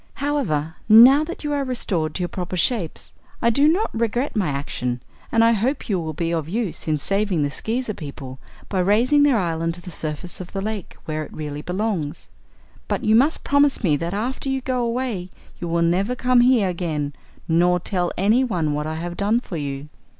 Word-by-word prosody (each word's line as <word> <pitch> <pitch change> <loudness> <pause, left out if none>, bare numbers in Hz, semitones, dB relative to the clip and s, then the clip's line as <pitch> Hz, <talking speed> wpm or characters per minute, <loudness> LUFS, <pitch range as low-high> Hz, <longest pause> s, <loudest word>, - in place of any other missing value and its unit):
"However, 175 - -1
now 250 +7 +9
that 340 - -7
you 295 0 -1
are 285 -1 0
restored 185 - -1
to - - -2
your - - 0
proper 180 0 -4
shapes, 180 -3 -1 0.3
I 235 - +3
do 280 +6 +4
not 365 +8 +2
regret 235 +4 -1
my 205 -5 +1
action 135 -3 -2 0.3
and 225 -1 +4
I 230 - +6
hope 235 +6 -1
you 195 -3 +1
will 160 -2 -4
be 165 +1 -1
of 160 -2 -2
use 195 -6 -3
in 155 -1 +2
saving 195 0 +1
the 145 - -1
Skeezer 225 - -2
people 140 -5 -8 0.3
by 190 - -1
raising 230 +10 +3
their 285 -4 +4
island 165 -3 -1
to 175 - -10
the 180 - -9
surface 160 +3 -5
of 180 - -10
the 195 - -2
lake, 210 -2 -5
where 155 0 -3
it - - -11
really 150 -1 -5
belongs. 180 -4 -3 0.6
But - - -2
you 215 - +4
must 275 +7 +3
promise 285 -2 +3
me 160 -6 +3
that 170 +5 -3
after 255 +6 -3
you 265 0 -1
go 255 -1 -1
away 235 -6 -2 0.3
you 175 - -4
will 170 0 +1
never 190 +8 +1
come 250 0 +3
here 245 -5 +4
again, 160 -5 -2 0.3
nor 175 +2 +3
tell 175 -1 -1
anyone 195 - +2
what 150 +1 -2
I 155 - -3
have 175 +2 -5
done 205 +5 +2
for 185 -8 -7
you." 140 -1 -4
185 Hz, 200 wpm, -22 LUFS, 160-240 Hz, 0.6 s, now